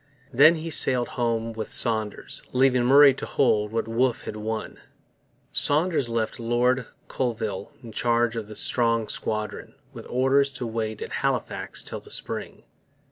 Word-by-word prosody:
Then 150 Hz, +7 st, +7 dB
he 165 Hz, +1 st, -5 dB
sailed 125 Hz, -4 st, +2 dB
home 115 Hz, -2 st, -2 dB
with 110 Hz, -1 st, -5 dB
Saunders, 110 Hz, -3 st, 0 dB
leaving 130 Hz, -1 st, +3 dB
Murray 140 Hz, +2 st, +7 dB
to -, -, -6 dB
hold 105 Hz, -6 st, +1 dB
what 115 Hz, 0 st, -2 dB
Wolfe 120 Hz, +2 st, 0 dB
had -, -, -6 dB
won. 110 Hz, +1 st, -5 dB, 0.7 s
Saunders 150 Hz, -3 st, +2 dB
left 115 Hz, -1 st, -2 dB
Lord 120 Hz, +2 st, +1 dB, 0.2 s
Colville 110 Hz, -6 st, -3 dB
in 115 Hz, -, -9 dB
charge 120 Hz, +1 st, +1 dB
of 110 Hz, -2 st, -5 dB
a 105 Hz, -, -9 dB
strong 115 Hz, -1 st, +1 dB
squadron, 110 Hz, -1 st, -3 dB, 0.2 s
with -, -, -10 dB
orders 135 Hz, +2 st, +2 dB
to 125 Hz, -2 st, -4 dB
wait 110 Hz, -2 st, -4 dB
at -, -, -8 dB
Halifax -, -, -2 dB
till -, -, -6 dB
the -, -, -17 dB
spring. -, -, -5 dB
120 Hz, 150 wpm, -25 LUFS, 110-130 Hz, 0.7 s, Then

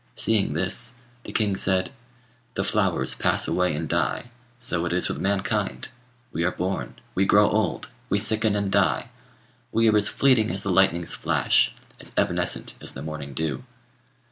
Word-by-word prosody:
Seeing 105 Hz, -7 st, +2 dB
this, 100 Hz, +9 st, -2 dB, 0.3 s
the -, -, -7 dB
king 105 Hz, -3 st, +1 dB
said, 95 Hz, +1 st, 0 dB, 0.6 s
'The -, -, -1 dB
flowers -, -, +2 dB
pass -, -, +2 dB
away 90 Hz, -3 st, +1 dB
and 80 Hz, +1 st, -3 dB
die; 120 Hz, -, -1 dB, 0.3 s
so 120 Hz, -9 st, -1 dB
is 90 Hz, +2 st, -1 dB
it -, -, +1 dB
with -, -, -7 dB
mankind: 95 Hz, -10 st, -1 dB, 0.4 s
we 85 Hz, -, -2 dB
are 90 Hz, -, +2 dB
born, 95 Hz, +2 st, -4 dB, 0.2 s
we 95 Hz, -, +1 dB
grow 105 Hz, +1 st, +5 dB
old, 105 Hz, -6 st, -1 dB, 0.2 s
we 100 Hz, -, +2 dB
sicken 110 Hz, 0 st, +2 dB
and 100 Hz, -1 st, -1 dB
die; 100 Hz, +4 st, +1 dB, 0.6 s
we 115 Hz, 0 st, +2 dB
are 110 Hz, -, +4 dB
as 100 Hz, -1 st, +4 dB
fleeting 125 Hz, -5 st, +3 dB
as 100 Hz, +1 st, -3 dB
the 100 Hz, -, -1 dB
lightning's 90 Hz, -2 st, +2 dB
flash, -, -, +2 dB, 0.3 s
as -, -, -6 dB
evanescent -, -, +1 dB
as -, -, -4 dB
the 65 Hz, -, -8 dB
morning 75 Hz, -3 st, -7 dB
dew.' 75 Hz, -3 st, -2 dB
95 Hz, 170 wpm, -24 LUFS, 85-105 Hz, 0.6 s, grow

